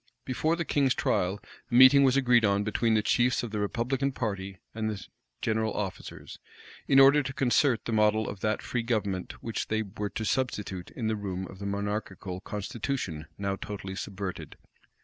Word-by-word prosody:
[] - - -51
Before 155 +6 0
the 170 0 -3
king's 140 -4 +2
trial, 95 +3 0 0.3
a - - -9
meeting 130 +2 +9
was 135 0 +4
agreed 125 -3 +4
on 100 -1 +2
between 110 +2 +1
the 105 - +2
chiefs 120 +3 +2
of 120 - -5
the 105 - -2
republican 125 +6 0
party 100 -6 -4 0.2
and 110 -1 -2
the 105 -2 -5 0.4
general 110 0 0
officers, 95 -3 -6 0.5
in 135 - +6
order 140 +2 +7
to 135 -1 -5
concert 135 -2 +2
the - - -3
model 110 0 +3
of 100 - -6
that 110 +1 -1
free 120 - -1
government 105 -6 -2
which 115 - -3
they 110 0 0
were 105 0 -5
to 110 - -4
substitute 105 -7 -2
in 115 - -5
the 110 0 +1
room 95 -3 -4
of 95 - -11
the 100 - -4
monarchical 100 -2 -3
constitution 105 - -4
now 100 -1 -1
totally 95 -1 -6
subverted. 95 -1 -6
110 Hz, 185 wpm, -28 LUFS, 100-125 Hz, 0.5 s, meeting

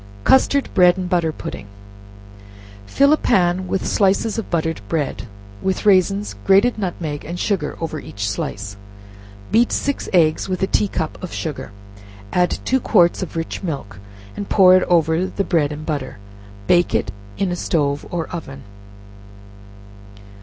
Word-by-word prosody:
Custard 270 - +3
Bread 180 -1 +5
and 185 -1 -3
Butter 170 -3 +1
Pudding. 100 -8 -8 1.2
Fill 280 - +4
a - - +3
pan 185 -6 +1
with 190 - -2
slices 205 +3 +1
of 225 - -6
buttered 160 -1 -1
bread, 150 -6 -2 0.3
with 190 +2 -2
raisins, 200 +1 +3
grated 200 +5 +4
nutmeg 165 -6 -4
and 175 +3 -6
sugar 185 -8 -1
over 160 -2 -4
each 100 -6 -5
slice; 100 0 -4 0.7
beat 235 +2 +3
six 280 0 -2
eggs 165 0 +2
with 185 0 -2
a - - +5
tea 205 +1 +1
cup 160 -5 -4
of 185 - -6
sugar; 140 -7 -5 0.6
add 180 0 +2
two 265 - +2
quarts 180 -8 +3
of 185 - -6
rich 165 0 -4
milk, 135 - -5 0.4
and 205 - -6
pour 185 -2 +6
it 185 - +4
over 165 +1 +2
the 200 - -2
bread 160 -6 +1
and 150 +1 -7
butter; 140 -7 -4 0.5
bake 175 - +3
it 100 - 0 0.3
in 190 -2 0
a - - -1
stove 145 -5 -1
or 170 -2 -2
oven. 150 -6 -7
175 Hz, 155 wpm, -20 LUFS, 155-195 Hz, 1.2 s, pour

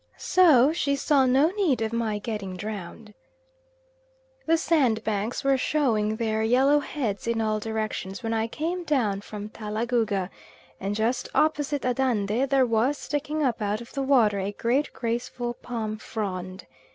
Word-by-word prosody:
So 305 -6 +5
she 280 -4 0
saw 275 -1 +3
no 275 +6 +4
need 370 - +1
of 220 +1 -3
my 225 -2 -1
getting 205 -4 -5
drowned. 210 +2 -7 1.3
The 330 +1 +4
sandbanks 225 -9 0
were 275 -1 +3
showing 225 -8 +1
their 220 -1 -1
yellow 260 +6 +4
heads 230 -9 -3
in 230 -1 0
all 215 -1 0
directions 215 -1 -4
when 225 0 -1
I 225 0 0
came 335 +8 -3
down 235 -11 0
from 210 0 -7
Talagouga, 215 -3 -1 0.5
and 200 +2 -2
just 230 +4 -1
opposite 290 -2 +1
Andande 250 -1 0
there 270 -1 +4
was 240 +5 +1
sticking 300 +2 -2
up 240 -4 0
out 205 +1 -1
of 235 - -12
the 275 - -2
water 240 -7 +3
a 195 +1 -3
great, 250 +8 0
graceful, 240 0 -3
palm 220 -3 -5
frond. 185 -4 -5
230 Hz, 150 wpm, -26 LUFS, 215-275 Hz, 1.3 s, So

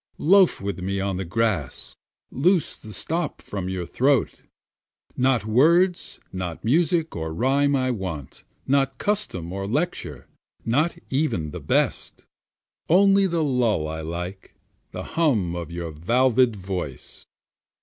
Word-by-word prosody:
Loafe 190 +2 +4
with 100 -1 -4
me 95 +2 -2
on 95 -1 -1
the 95 - -2
grass, 95 - -2 0.4
loose 170 +4 +2
the 110 - -12
stop 165 +7 -3
from 95 -3 -5
your 95 -2 -3
throat, 130 +8 +1 0.7
Not 125 -4 +2
words, 170 - +3
not 90 -3 -5
music 165 +5 +2
or 80 -1 -3
rhyme 140 - +2
I 130 -1 +1
want, 95 - -6 0.2
not 135 0 +1
custom 145 - -2
or 100 0 -4
lecture, 115 - -3 0.4
not 155 +9 +1
even 130 - 0
the - - -6
best, - - -1 0.6
Only 195 +3 +5
the 170 -3 0
lull 120 - +1
I 80 +1 -5
like, 90 +4 -6 0.3
the - - -6
hum 115 - 0
of 85 -2 -5
your 85 -1 -5
valved 120 +8 +2
voice. 90 -8 -6
115 Hz, 130 wpm, -24 LUFS, 90-150 Hz, 0.7 s, Only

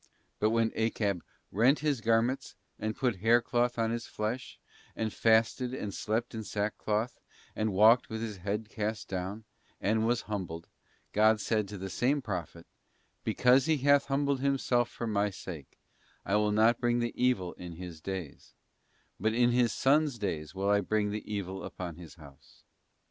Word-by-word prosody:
But 110 - +3
when 115 0 +2
Achab 105 -5 0 0.3
'rent 120 - +4
his 145 -5 0
'garments, 115 +3 +1 0.2
and 110 0 -2
put 125 -6 0
haircloth 120 +3 +2
on 115 -1 +1
his 115 0 -3
flesh, 110 +4 -4 0.4
and 110 -1 -2
fasted 115 +3 +2
and 105 -6 -4
slept 115 +3 -2
in 110 -1 -4
sackcloth, 105 +2 -2 0.4
and 110 0 0
walked 110 +6 +5
with 110 - -4
his 110 -3 -4
head 105 +4 -3
cast 110 0 -3
down,' 95 +4 -4 0.4
and 110 +2 +1
was 120 0 +1
humbled, 90 -6 -5 0.5
God 110 +1 +4
said 105 -1 0
to 100 +1 -7
the 95 +1 -5
same 135 - +1
Prophet, 90 - -5 0.3
' - - -42
Because 130 +2 +4
he 160 -1 +3
hath 140 +1 +4
humbled 140 0 0
himself 130 -3 +1
for 120 - -5
My 105 -2 +1
sake, 85 -7 -9 0.5
I 100 - +1
will 105 0 +2
not 110 +3 +3
bring 120 -1 +2
the 120 -1 -1
evil 115 -9 +1
in 90 -1 -9
his 85 -2 -9
days; 95 -6 -7 0.6
but 110 +3 +1
in 120 0 +4
his 120 -1 +3
son's 145 0 +2
days 85 -5 -4
will 100 +1 +1
I 100 0 +4
bring 105 +1 0
the 105 +1 -3
evit 95 -2 -5
upon 85 -3 -6
his 85 -2 -11
house. 70 -5 -17
110 Hz, 170 wpm, -30 LUFS, 100-120 Hz, 0.6 s, walked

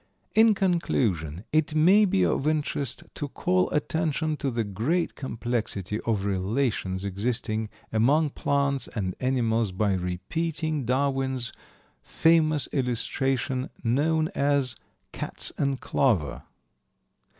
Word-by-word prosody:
In 220 -1 +6
conclusion, 105 - 0
it 155 0 +2
may 190 +7 +6
be 95 - +2
of 135 - 0
interest 145 -4 -1
to 145 - -4
call 90 -8 +1
attention 155 0 0
to 140 - -1
the 115 -2 -1
great 120 - -1
complexity 115 -5 -3
of 105 -4 -1
relations 100 -1 -1
existing 110 +2 -2 0.2
among 140 +7 +3
plants 140 -2 0
and 95 -4 -3
animals 115 -5 +1
by 100 +2 +1
repeating 145 - -2
Darwin's 130 -1 0 0.5
famous 155 -3 +3
illustration 130 +1 -1
known 155 +7 +2
as 140 -3 +1 0.4
"Cats - - -4
and 140 -1 0
Clover." 105 - 0
130 Hz, 105 wpm, -26 LUFS, 110-150 Hz, 0.5 s, In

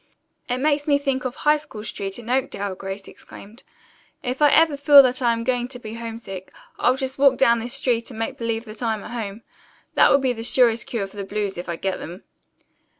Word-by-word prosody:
"It 250 - 0
makes 290 +2 0
me 285 -1 +4
think 270 -2 -2
of 255 - -3
High 300 0 +3
School 255 -8 -10
Street 195 -3 -4
in 235 -2 -11
Oakdale!" 235 -6 -1
Grace 195 +1 -7
exclaimed. 215 +4 -13 0.6
"If 255 +3 -3
ever 305 +2 +5
I - - -2
feel 285 0 +8
that 255 0 0
I'm 230 -2 +1
going 245 0 0
to 255 -1 -6
be 220 -3 -9
homesick, 225 -5 -7 0.3
I'll 250 - +3
just 265 0 -4
walk 275 -2 +5
down 235 -3 +4
this 240 +3 -2
street 240 -4 0
and 240 - -10
make 225 - -3
believe 230 0 -2
that 215 +1 -9
I'm 220 -3 -1
at - - -9
home! 225 -2 -5 0.5
That - - +5
will 275 - +6
be 265 -2 0
the 225 - -7
surest 235 -1 +3
cure 225 -5 -2
for 195 +1 -14
the 200 - -3
blues, 205 0 -3
if 175 0 -7
I 170 - -2
get 190 +3 -3
them." 175 +5 -9
235 Hz, 220 wpm, -23 LUFS, 215-265 Hz, 0.6 s, feel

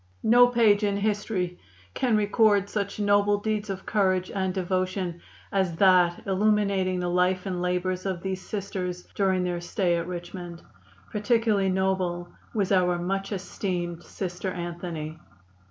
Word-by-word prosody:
"No 245 +2 +7
page 225 -4 +4
in 200 -1 +1
history 200 -3 -1 0.3
can 240 -4 +2
record 205 -1 +3
such 200 0 -3
noble 205 0 +3
deeds 215 0 -2
of 190 -1 -5
courage 185 -3 +1
and 190 -1 0
devotion 185 -1 -2 0.3
as 190 -4 +1
that 180 -1 +4
illuminating 195 -2 +1
the 180 - -1
life 180 +1 +1
and 180 -2 -2
labors 180 +1 -1
of 185 -3 -3
these 190 -1 -3
Sisters 185 -3 -4
during 190 -2 +1
their 175 -1 -2
stay 175 -1 0
at 170 0 -3
Richmond. 175 -1 -7 0.5
Particularly 210 -2 +2
noble 185 -2 0 0.2
was 205 -3 -1
our 180 -2 +3
much 195 +3 -2
esteemed 180 -3 -3
Sister 180 0 -5
Anthony. 170 -3 -5
190 Hz, 140 wpm, -26 LUFS, 180-205 Hz, 0.5 s, No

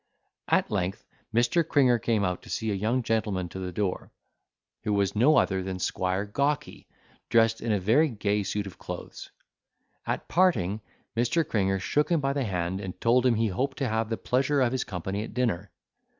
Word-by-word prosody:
At - - +2
length, 90 +2 -2 0.3
Mr. 120 +9 +3
Cringer 130 -6 +3
came 110 -3 +1
out 90 0 -2
to - - -14
see 110 -1 -2
a - - 0
young 110 +6 0
gentleman 105 -6 -1
to 95 - -7
the 90 -1 -4
door, 95 0 -2 0.7
who 105 -1 0
was 100 -1 +1
no 135 +9 +5
other 95 -1 +2
than 95 0 -4
Squire 95 +1 -1
Gawky, 140 +8 -2 0.4
dressed 115 -1 +3
in 115 - -1
a 105 - +2
very 120 - +3
gay 105 -3 0
suit 100 +1 -2
of 95 - -10
clothes; - - -8 0.8
at - - -2
parting 110 - +2 0.3
Mr. 125 +8 +1
Cringer 95 -2 +1
shook 150 +10 0
him 170 -2 +3
by 135 -1 0
the 140 -2 -1
hand 90 -1 -2
and 95 -2 -7
told 125 +2 +3
him 120 - +3
he 110 0 +1
hoped 130 +8 -2
to 135 - -1
have 110 0 -1
the 115 - -1
pleasure 135 +3 +1
of 125 -3 +3
his 130 - -1
company 95 +2 -4
at - - -9
dinner. 105 -7 0
110 Hz, 195 wpm, -27 LUFS, 95-125 Hz, 0.8 s, no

